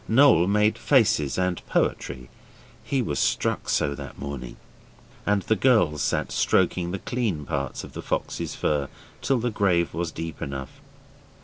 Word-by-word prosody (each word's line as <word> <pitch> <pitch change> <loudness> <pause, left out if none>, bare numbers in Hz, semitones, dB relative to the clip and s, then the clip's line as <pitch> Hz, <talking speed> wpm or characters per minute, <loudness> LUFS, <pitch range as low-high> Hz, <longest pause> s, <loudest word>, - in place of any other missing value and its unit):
Noel 115 - +5
made 105 +2 +2
faces 100 - +3
and 90 -1 -1
poetry 65 -2 -1 0.6
he 135 -3 0
was - - -2
struck - - 0
so 70 - +1
that - - -9
morning 70 -3 -6 0.7
and 105 -1 +2
the 110 - +2
girls 95 - +3
sat - - 0
stroking 85 -1 +2
the 95 - -3
clean 105 - -2
parts 70 -4 -3
of - - -11
the - - -6
fox's - - -3
fur 70 -2 0 0.3
till 135 - +2
the 120 0 -1
grave 90 -5 +1
was 85 0 -2
deep 80 0 -6
enough. 70 -1 -6
85 Hz, 150 wpm, -25 LUFS, 70-110 Hz, 0.7 s, Noel